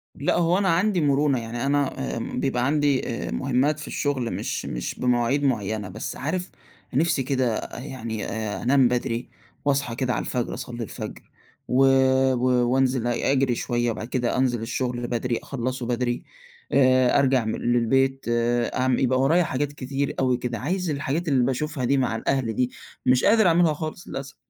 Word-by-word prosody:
لأ، 140 - 0
هو 175 +1 +3
أنا 195 -1 +1
عندي 180 +2 +2
مرونة 140 -2 +2
يعني 120 +2 -4
أنا 140 -1 0 0.2
آآ، - - -3
بيبقى 125 +1 -1
عندي 145 -1 +1 0.2
آآ، - - -5
مهمات 140 +3 +1
في 155 - -8
الشغل 130 -5 -1
مش - - -3
مش - - -4
بمواعيد 125 +3 +1
معينة، 110 -6 -1
بس 110 +4 -5
عارف 180 +6 -3 0.4
نفسي 145 0 +2
كده 130 -4 -1
يعني 120 -5 -5
آآ، 110 -2 -4
أنام 130 +1 +4
بدري 120 0 -2 0.4
واصحي 140 -4 0
كده 125 0 0
على 105 - -1
الفجر 125 -2 -2
أصلي 120 -2 -5
الفجر 110 - -7 0.5
و 130 +2 +4 0.5
و 125 -1 +2
وأنزل 130 -2 +1
أجري 130 +1 +1
شوية، 120 0 -1
وبعد 110 0 -5
كده 125 -1 -1
أنزل 125 -3 +1
الشغل 120 +1 -2
بدري، 120 0 -1
أخلَصه 130 -1 -3
بدري 120 0 -1 0.5
آآ، 130 -1 +4
أرجع 130 -4 +2
م 110 - -1
للبيت 135 +3 +1
آآ، 120 0 +1
أع 130 - +2
يبقى 130 0 +2
ورايا 165 +6 +4
حاجات 145 -1 -2
كتير 140 0 -3
أوي 130 -2 +2
كده، 120 -1 -3
عايز 180 +6 -2
الحاجات 150 +3 -2
اللي 135 -4 +3
باشوفها 145 +1 -2
دي 140 +3 +2
مع 125 -4 0
الأهل 125 -1 -1
دي، 125 +3 0 0.3
مش 125 0 +4
قادر 220 -2 +5
أعملها 170 -2 +4
خالص 155 +3 -6
للأسف. 135 +1 -6
130 Hz, 170 wpm, -24 LUFS, 120-140 Hz, 0.5 s, قادر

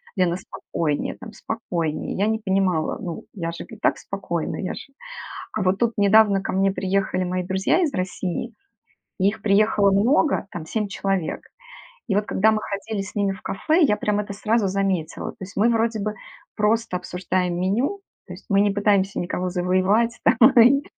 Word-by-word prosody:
"Лена, 180 -3 +2
спокойнее 160 -5 -3
там, 220 - -10
спокойнее." 175 -9 -3
Я 200 - +2
не 220 0 0
понимала, 190 -6 0
ну 170 -2 -6
я 170 -4 -3
же 170 - -7
и 225 - -11
так - - +1
спокойна, 175 -4 -4
я 185 - -3
ж - - -9 0.7
А 215 - -2
вот 185 0 +2
тут 235 -1 +1
недавно 205 -1 +5
ко - - -3
мне 195 +1 +2
приехали 190 -1 0
мои 180 0 -2
друзья 190 - +1
из 305 - -1
России, 185 +4 -3 0.7
и 190 - +3
их 210 0 -7
приехало 205 0 +3
много, 235 +7 +2
там 165 -2 -6
7 210 +5 -2
человек. 195 -4 -2 0.7
И 200 - 0
вот 205 +1 +1
когда 215 +2 +3
мы 215 - +1
ходили 200 +1 -4
с 195 - -10
ними 200 -2 +1
в 195 - -12
кафе, 310 - +1
я 210 -8 +3
прям 210 0 0
это 205 -1 -4
сразу 215 +1 +1
заметила. 190 -4 -1
То - - -23
есть 190 +1 -8
мы 220 +4 +4
вроде 225 -1 +1
бы 210 +1 -2 0.4
просто 215 -2 +1
обсуждаем 180 0 -2
меню, 240 - 0 0.3
то 180 - -8
есть 180 - -13
мы 200 -1 +4
не 205 0 +3
пытаемся 200 -1 +1
никого 180 +1 -2
завоевать 185 +6 +1
там 250 +4 +6
и, 275 +5 +5
200 Hz, 185 wpm, -23 LUFS, 185-220 Hz, 0.7 s, там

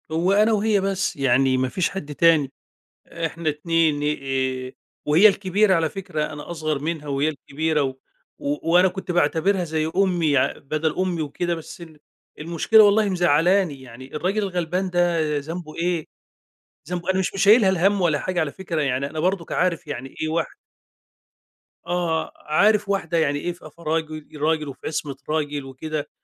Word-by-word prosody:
هو 170 +4 +1
أنا 215 +2 +4
وهي 210 0 +2
بس، 195 -1 -1
يعني 130 -1 +2
ما 130 0 0
فيش 180 +6 0
حد 150 -6 -6
تاني، 160 -5 +4 0.6
إحنا 165 -1 -3
2 155 -1 +1 0.6
آآ، - - -10 0.3
وهي 165 +8 +6
الكبيرة 195 0 +2
على 165 -1 +1
فكرة، 180 -6 -4
أنا 150 +3 -8
أصغر 155 -3 -2
منها، 155 0 -4
وهي 140 +1 0
الكبيرة 155 +1 -2
و 130 -1 -3 0.8
وأنا 180 +2 +6
كنت 190 0 -5
باعتبرها 175 +2 +2
زي 160 -1 -2
أمي 180 -5 +2
يع 140 -2 +2
بدل 155 +2 -2
أمي 185 -3 -1
وكده، 170 +4 -2
بس 165 +1 -10
ال 160 -3 -12 0.4
المشكلة 170 +7 +4
والله 205 0 +4
مزعلاني، 175 -2 +2
يعني 130 +2 -11
الراجل 190 +7 0
الغلبان 180 0 -2
ده 170 -4 +1
ذنبه 160 +2 -7
إيه؟ 170 -2 -1 0.8
ذنبه 180 0 -2
أنا 190 - +1
مش 190 - -1
مشيّلها 200 +2 +5
الهمّ 190 +2 +2
ولا 165 -4 +2
حاجة 180 +2 -2
على 150 -3 -1
فكرة 175 -4 -4
يعني، 135 0 0
أنا 155 - -4
برضك 180 0 -1
عارف 180 -2 0
يعني 135 -2 -7
إيه 155 - -1
واحدة 160 -1 -2 1.3
آه، 170 -2 -1
عارف 205 +7 +2
واحدة 175 -4 0
يعني 145 -3 +1
إيه 175 - -2
في 170 -3 -13
في 170 - -17
راجل 155 -1 -3
راجل 155 0 +1
وفي 135 - -8
عصمة 145 -3 -3
راجل 150 -2 -2
وكده، 145 +3 -5
165 Hz, 160 wpm, -23 LUFS, 150-185 Hz, 1.3 s, وهي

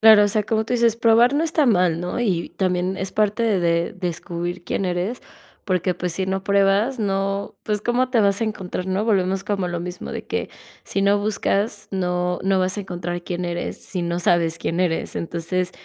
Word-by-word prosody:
Claro, 215 -2 +8
o - - +2
sea, 210 +1 +1
como 220 +1 0
tú 245 - 0
dices 230 -1 +3
probar 235 +2 +5
no 305 - +2
está 315 -2 +2
mal, 180 -8 +3
¿no? 180 +7 -3
Y 185 -8 0
también 185 0 0
es 190 0 -3
parte 215 +2 +1 0.2
de 170 -1 +1
descubrir 175 0 -4
quién 195 - -2
eres, 180 +6 -2 0.4
porque, 185 -2 0
pues, 180 -1 -3
si 190 +2 -1
no 190 +1 -2
pruebas, 200 +5 +3
¿no? 195 -1 -1
Pues, 210 -1 -1
¿cómo 250 +3 +1
te 235 -3 +3
vas 200 +2 +2
a - - +2
encontrar?, 190 -4 -4
¿no? 190 +2 0
Volvemos 195 -2 +1
como 200 -3 -1
lo 175 -1 -3
mismo 180 +1 -6
de - - -6
que - - -3 0.3
si 195 - -2
no 200 +1 +4
buscas 205 0 -1
no, 180 -1 -1
no 190 0 +2
vas 185 +1 0
a 205 - -3
encontrar 175 -1 -4
quién 175 0 -3
eres, 175 0 -3
si 180 -3 -4
no 170 0 -1
sabes 170 -1 +2
quién 165 - -2
eres. 175 -3 0
Entonces, 175 +2 -2
190 Hz, 205 wpm, -22 LUFS, 180-210 Hz, 0.4 s, Claro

